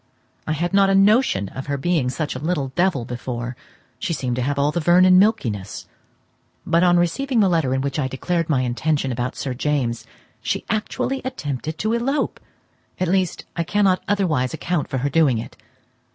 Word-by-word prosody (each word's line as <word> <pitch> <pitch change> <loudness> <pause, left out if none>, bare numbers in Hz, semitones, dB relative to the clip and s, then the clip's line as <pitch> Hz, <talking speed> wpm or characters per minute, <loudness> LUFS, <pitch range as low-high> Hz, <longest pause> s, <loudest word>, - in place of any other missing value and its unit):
I 155 - +1
had 175 +4 -2
not 195 0 +5
a 195 - +3
notion 195 - +3
of 130 - -7
her 140 -1 -1
being 155 -3 0
such 150 +4 -3
a - - -4
little 150 -3 -1
devil 165 -4 0
before, 120 0 -5 0.4
she 170 - -2
seemed 125 -5 -2
to - - 0
have 140 +3 -1
all 140 +1 +2
the 175 - -1
Vernon 185 +3 +6
milkiness; 115 - 0 0.8
but 170 - +2
on 175 -1 +5
receiving 230 +10 +1
the 200 - +5
letter 165 -7 +1
in 130 0 0
which 140 +1 -2
I 135 - 0
declared 165 +5 -2
my 135 -5 +2
intention 135 +3 0
about 125 +1 -3
Sir 135 -3 -3
James, 120 -4 -1 0.3
she 115 - -2
actually 225 +5 -2
attempted 155 - -4
to 215 +1 -1
elope; 270 +5 -1 0.6
at 185 - 0
least, 185 -1 0
I 170 - 0
cannot 190 +1 +2
otherwise 160 -10 0
account 170 -1 -2
for 135 - -2
her 135 +3 -1
doing 145 -6 +3
it. 110 - -7
155 Hz, 185 wpm, -22 LUFS, 130-185 Hz, 0.8 s, Vernon